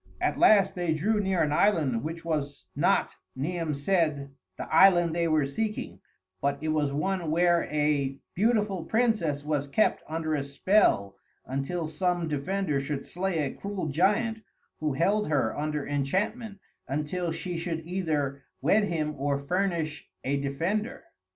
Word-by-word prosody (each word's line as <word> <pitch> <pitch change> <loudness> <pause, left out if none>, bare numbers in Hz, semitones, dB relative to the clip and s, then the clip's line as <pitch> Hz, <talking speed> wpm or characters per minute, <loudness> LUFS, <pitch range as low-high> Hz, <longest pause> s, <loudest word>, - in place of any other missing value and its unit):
At - - 0
last 210 - +6
they 175 -3 -1
drew 210 +7 +1
near 190 -4 +1
an 150 - 0
island 150 - +2
which 165 +2 -5
was 145 - -3
not, - - +2 0.2
Niam 160 +2 -2
said, 145 -3 0 0.3
the - - -5
island 175 -1 +6
they 170 -1 +1
were 155 -3 +2
seeking; 215 +10 -3 0.4
but 140 0 0
it 155 - -3
was 150 -2 +1
one 175 +3 -1
where 170 +1 +3
a 145 -3 0 0.2
beautiful 210 -3 +1
princess 215 -12 +1
was 145 -2 -1
kept 215 +10 +2
under 160 0 -2
a 145 - 0
spell 140 - +2 0.3
until 140 +6 -2
some 175 +2 -1
defender 150 +1 -1
should 140 0 -4
slay 180 -3 -1
a 135 - -4
cruel 200 -5 -4
giant 210 - +1 0.4
who 150 -2 -1
held 200 +9 +1
her 135 -7 +1
under 150 -1 -2
enchantment 195 - -1 0.3
until 150 +5 -2
she 175 +2 -4
should 165 -1 -3
either 155 -6 -1 0.2
wed 205 +10 +3
him 155 -5 -1
or 140 0 +1
furnish 165 0 -2
a 135 +2 0
defender. 165 - -2
160 Hz, 150 wpm, -28 LUFS, 145-190 Hz, 0.4 s, last